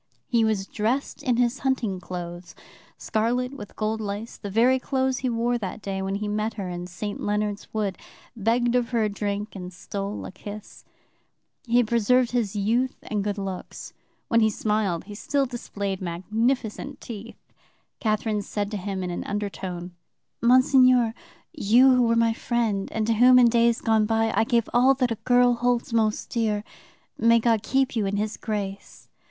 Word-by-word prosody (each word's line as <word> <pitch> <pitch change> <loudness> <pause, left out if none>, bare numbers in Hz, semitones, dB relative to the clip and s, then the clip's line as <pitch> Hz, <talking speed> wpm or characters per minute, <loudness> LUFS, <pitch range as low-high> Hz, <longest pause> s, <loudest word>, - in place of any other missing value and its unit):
He 235 -2 +2
was 215 -3 +1
dressed 225 +7 -2
in 245 -3 +1
his 245 +1 +1
hunting 245 -8 -1
clothes, 175 -1 -7 0.4
scarlet 245 +4 -1
with 205 -7 -10
gold 220 +1 -1
lace, 210 +2 -5
the 205 - -7
very 240 +6 +3
clothes 260 -1 0
he 255 - -1
wore 240 +1 0
that 200 0 -5
day 195 -2 -4
when 195 +1 -2
he 210 +1 -3
met 215 +1 -2
her 200 -3 -4
in 175 0 -5
St. 200 +4 -5
Leonard's 210 0 -2
Wood, 205 -3 -2 0.4
begged 235 +2 +1
of 245 -2 +1
her 235 -3 +1
a 215 - +1
drink, 205 +1 -3
and 180 -2 -7
stole 200 +3 -5
a - - -7
kiss. 205 +2 -10 0.8
He 235 +1 +3
had 245 -3 +4
preserved 235 +2 +3
his 230 -5 -1
youth 230 +6 +1
and 210 -2 -2
good 205 0 -2
looks. 195 -2 -6 0.3
When 230 - +3
he 220 -1 +4
smiled, 210 -5 -1
he 205 +3 -10
still 275 +6 0
displayed 200 -6 -4
magnificent 215 +7 -2
teeth. 230 0 -9 0.6
Catherine 215 -1 0
said 205 +1 -3
to 210 - -2
him 190 -1 -4
in 180 - -3
an 175 - -4
undertone: 190 -4 -4 0.5
"'Monseigneur, 255 -1 +5 0.4
you 255 -1 +5
who 250 - +4
were 230 -1 +3
my 230 0 +3
friend, 225 -4 -1
and 220 -1 -1
to 230 - +2
whom 250 +3 +6
in 245 -2 +7
days 235 0 +3
gone 220 -2 +2
by 225 0 +1
I - - +3
gave 235 -1 +1
all 255 +3 +5
that 250 -2 0
a - - 0
girl 245 0 +5
holds 240 0 0
most 220 -2 0
dear, 215 -3 0 0.6
may 230 0 +5
God 230 -2 +2
keep 265 +2 0
you 215 -3 +1
in 200 +1 -1
His 215 +1 -2
grace! 200 -3 -5
220 Hz, 180 wpm, -25 LUFS, 205-240 Hz, 0.8 s, in